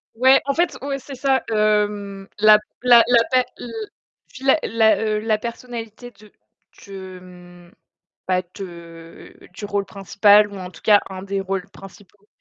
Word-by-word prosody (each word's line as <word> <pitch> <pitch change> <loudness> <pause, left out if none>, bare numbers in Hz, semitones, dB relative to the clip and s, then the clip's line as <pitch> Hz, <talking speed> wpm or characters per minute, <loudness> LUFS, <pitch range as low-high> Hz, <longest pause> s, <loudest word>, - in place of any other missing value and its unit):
Ouais, 260 +3 +5
en 275 - 0
fait, 345 +3 0
oui, 280 0 -3
c'est 270 +1 -10
ça, 265 -1 0
hem, 210 -2 -1
la 215 0 +7 0.2
la 240 -2 +7
la 235 -2 +4
pa 255 - +4 0.2
l 240 - -8 0.6
fi 260 - -14
la 270 +3 +4
la, 225 -1 +3
heu, 215 -1 -1
la 215 0 0
personnalité 235 0 -8
de 210 0 -20 0.6
de, 190 -2 -9
mmh, 175 -1 -16 0.6
bah 185 -1 +1
de 170 -3 -11 0.2
du 205 - -8
rôle 200 -1 -2
principal 205 +1 +3
ou - - -9
en 180 -1 -7
tout - - -17
cas 205 -1 +5
un 190 0 -8
des 195 0 -3
rôles 195 0 -4
principaux. 195 +1 -16
210 Hz, 165 wpm, -21 LUFS, 195-235 Hz, 0.6 s, la